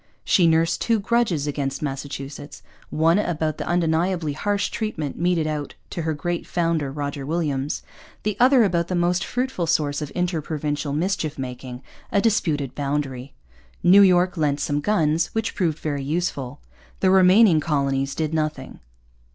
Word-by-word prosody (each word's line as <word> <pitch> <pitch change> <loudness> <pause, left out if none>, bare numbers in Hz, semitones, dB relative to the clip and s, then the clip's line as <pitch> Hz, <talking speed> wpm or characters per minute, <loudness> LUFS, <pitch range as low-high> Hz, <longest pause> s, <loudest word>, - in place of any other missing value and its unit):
She 175 -3 +4
nursed 165 +1 +2
two 230 -2 +2
grudges 200 -8 +1
against 140 -1 -3
Massachusetts, 140 +1 -6 0.3
one 165 +4 +3
about 160 -5 -1
the - - -4
undeniably 170 -1 0
harsh 205 +7 -1
treatment 160 -10 -3
meted 175 -1 +1
out 150 -2 -4 0.2
to 170 - -3
her 160 -1 -1
great 175 +3 -3
founder, 165 -5 0
Roger 140 -1 -4
Williams, 145 -2 -2 0.4
the 210 -1 -1
other 255 0 +6
about 170 -4 +1
that 185 - -2
most 175 +1 +1
fruitful 250 -9 -2
source 145 -2 0
of 150 - -5
inter 180 -2 0
provincial 150 -1 -3
mischief 160 0 -1
making, 125 -1 -7 0.3
a 200 - +3
disputed 160 - 0
boundary. 140 -2 -3 0.5
New 190 +3 +7
York 185 -1 +4
lent 145 -2 +1
some 145 0 -1
guns, 165 -2 +1
which 225 0 -1
proved 165 -6 0
very 145 -4 -3
useful. 145 -3 -3 0.4
The 185 - +4
remaining 190 -1 +6
colonies 140 -3 -1
did 155 -1 -2
nothing. 155 -4 -3
160 Hz, 150 wpm, -23 LUFS, 145-180 Hz, 0.5 s, New